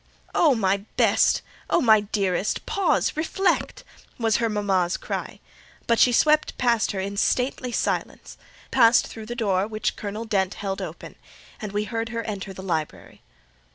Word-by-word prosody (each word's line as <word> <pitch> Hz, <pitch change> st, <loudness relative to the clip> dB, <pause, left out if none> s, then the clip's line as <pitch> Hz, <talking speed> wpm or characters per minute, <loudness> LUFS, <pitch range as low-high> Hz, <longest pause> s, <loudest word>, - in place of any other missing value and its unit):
"Oh, 300 Hz, -6 st, +4 dB
my 195 Hz, -3 st, +2 dB, 0.2 s
best! -, -, +3 dB, 0.3 s
oh, -, -, +3 dB
my 220 Hz, -7 st, +6 dB
dearest! 200 Hz, -2 st, -1 dB
pause—reflect!" 385 Hz, -2 st, 0 dB, 0.3 s
was 225 Hz, -2 st, +2 dB
her 230 Hz, -1 st, 0 dB
mama's 195 Hz, -4 st, 0 dB
cry; -, -, -5 dB, 0.5 s
but 235 Hz, -1 st, +2 dB
she 250 Hz, -, +6 dB
swept 305 Hz, +5 st, +3 dB
past 235 Hz, -3 st, +2 dB
her 195 Hz, -, -3 dB
in 200 Hz, +1 st, -4 dB
stately 250 Hz, +2 st, 0 dB
silence, -, -, -3 dB, 0.4 s
passed 235 Hz, -2 st, +5 dB
through 220 Hz, -1 st, -9 dB
the 240 Hz, -, -5 dB
door 200 Hz, -4 st, 0 dB
which 215 Hz, -1 st, -2 dB
Colonel 210 Hz, +2 st, -5 dB
Dent 195 Hz, -4 st, 0 dB
held 195 Hz, -1 st, -4 dB
open, -, -, -8 dB, 0.4 s
and 210 Hz, -3 st, -5 dB
we 205 Hz, +1 st, -1 dB
heard 225 Hz, +1 st, -3 dB
her 230 Hz, 0 st, -3 dB
enter 200 Hz, -3 st, -5 dB
the 190 Hz, 0 st, -9 dB
library. 160 Hz, -5 st, -4 dB
215 Hz, 155 wpm, -24 LUFS, 195-240 Hz, 0.5 s, my